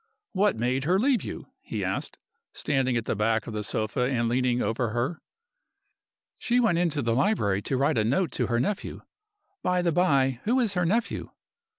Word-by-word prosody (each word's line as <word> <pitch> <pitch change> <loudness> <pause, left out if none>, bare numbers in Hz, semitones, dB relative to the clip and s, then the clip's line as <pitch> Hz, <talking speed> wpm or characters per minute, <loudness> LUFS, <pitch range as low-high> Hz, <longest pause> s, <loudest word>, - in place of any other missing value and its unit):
"What 205 +2 +2
made 125 +4 -1
her 180 +4 +3
leave 255 +2 +2
you?" - - -6 0.2
he - - -4
asked, - - -3 0.4
standing 130 -4 0
at 115 - -2
the - - -1
back 110 +1 +1
of 115 - -7
the 105 0 -3
sofa 110 +3 -2
and 120 -3 0
leaning 125 +1 +1
over 115 0 -1
her. 120 +9 -2 1.2
"She 245 +1 +2
went 175 -8 +2
into 155 -5 0
the 115 0 +1
library 115 - +1
to 130 - -2
write 140 -1 +2
a - - +2
note 150 - +1
to - - -1
her 120 0 +1
nephew. 195 +11 -3 0.6
By 180 -1 +1
the 170 - +2
by, 135 -8 +2
who 245 +5 +2
is 225 -5 +1
her 180 -2 +1
nephew?" 225 +6 -1
135 Hz, 190 wpm, -26 LUFS, 115-180 Hz, 1.2 s, her